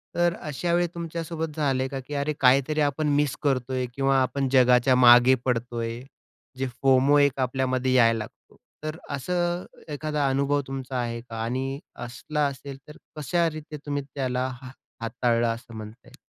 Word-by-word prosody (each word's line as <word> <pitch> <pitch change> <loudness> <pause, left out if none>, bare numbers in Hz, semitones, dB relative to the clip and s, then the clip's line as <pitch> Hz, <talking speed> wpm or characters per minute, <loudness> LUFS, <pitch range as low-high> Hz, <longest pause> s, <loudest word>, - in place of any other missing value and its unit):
तर 175 0 +2
अशा 170 +3 -2
वेळी 175 0 +2
तुमच्यासोबत 165 -2 -4
झालंय 135 -4 0
का 135 0 -5
की, 130 +3 -9
"अरे 145 +2 -1
काहीतरी 135 +4 +4
आपण 145 +1 +1
मिस 145 -5 0
करतोय?" 130 -2 0
किंवा 135 -1 +2
"आपण 135 +1 0
जगाच्या 125 0 +5
मागे 125 +1 +7
पडतोय." 120 -1 -2 0.6
जे 130 0 -1
FOMO 135 +2 +5
एक 140 -1 +2
आपल्यामध्ये 130 0 0
यायला 115 -3 +5
लागतो. 105 - -11 0.3
तर 155 +1 -4 0.2
असं 175 +4 -1 0.3
एखादा 150 -1 -1
अनुभव 140 +2 +1
तुमचा 135 -1 -5
आहे 115 -1 -3
का? 115 -2 -7
आणि 130 +4 -2 0.3
असला 145 +5 -2
असेल 140 0 -7
तर 150 - -12 0.2
कशा 165 +4 +1
रीती 155 0 -8
तुम्ही 145 -1 -2
त्याला 130 -2 -2
हा 130 - -9 0.3
हाताळलं 115 0 +1
असं 115 +1 -11
म्हणता 110 +3 -10
येईल? - - -16
135 Hz, 160 wpm, -25 LUFS, 125-150 Hz, 0.6 s, मागे